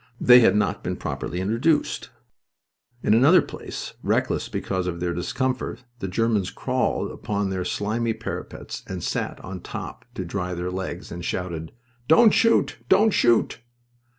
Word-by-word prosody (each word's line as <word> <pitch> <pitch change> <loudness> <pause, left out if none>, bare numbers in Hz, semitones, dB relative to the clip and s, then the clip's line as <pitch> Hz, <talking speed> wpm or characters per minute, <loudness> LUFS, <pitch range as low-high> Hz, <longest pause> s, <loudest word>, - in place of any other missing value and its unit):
They 125 0 +8
had 110 -5 +5
not 105 - +1
been - - -2
properly 90 - -4
introduced. 115 +11 +1 0.9
In - - +3
another 140 +11 +7
place, - - -7
reckless - - 0
because 95 -2 -2
of 85 -1 -3
their 85 0 -1
discomfort, 125 +9 -2 0.2
the 95 - -3
Germans 105 0 +1
crawled - - -1
upon 100 -2 -2
their 95 -1 -2
slimy 110 +5 -1
parapets 110 - -6
and 90 -2 -5
sat - - -2
on 95 0 -6
top - - -7
to - - -4
dry 90 -2 -3
their 90 +1 -3
legs, 95 0 -5
and 85 0 -6
shouted: 85 -3 -3 0.4
"Don't 210 +8 +7
shoot! 230 -2 +3
Don't 210 +3 +5
shoot!" 120 - +3
100 Hz, 150 wpm, -24 LUFS, 90-125 Hz, 0.9 s, They